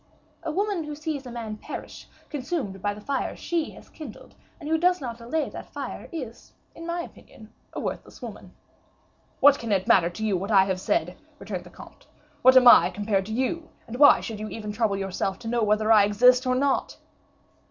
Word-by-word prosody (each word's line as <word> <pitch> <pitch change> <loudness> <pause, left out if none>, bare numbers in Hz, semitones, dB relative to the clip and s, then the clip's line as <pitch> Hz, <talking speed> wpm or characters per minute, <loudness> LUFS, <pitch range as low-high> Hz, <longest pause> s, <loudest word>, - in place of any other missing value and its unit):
"A 325 -1 -3
woman 395 0 -1
who 300 0 -6
sees 295 -3 -5
a - - -8
man 225 -3 -6
perish, - - -9 0.2
consumed 255 - -4
by 205 - 0
the - - -10
fire 275 +4 -2
she 335 -3 -2
has - - -15
kindled, 295 -9 -11 0.3
and 300 - -8
who 320 - +2
does 360 +1 +3
not 235 -4 -6
allay 295 +7 -1
that - - -9
fire, - - -7
is, 255 -9 -8 0.2
in 330 +1 -9
my 340 0 -2
opinion, 220 -9 -14 0.2
a - - -4
worthless - - -6
woman." - - -9 0.9
"What 285 0 +7
can 230 -2 -4
it 190 -2 +1
matter 175 -3 +5
to 215 +5 -5
you 205 -3 +1
what 195 +3 -3
I 195 -2 +4
said?" 190 - -1 0.2
returned - - -6
the - - -12
comte. - - -15 0.3
"What 260 +1 +7
am 250 -1 +7
I 240 - +8
compared 200 0 -1
to - - -6
you, 290 +7 -2 0.2
and 245 +2 -8
why 285 - +7
should 220 -2 -6
you 215 0 -5
even 210 -2 -6
trouble 210 -2 0
yourself 195 0 -2
to 225 - -10
know 235 +1 0
whether 215 +1 +2
I 210 -2 +7
exist 250 +5 +4
or 255 - +2
not?" 275 +1 0
235 Hz, 205 wpm, -25 LUFS, 210-295 Hz, 0.9 s, I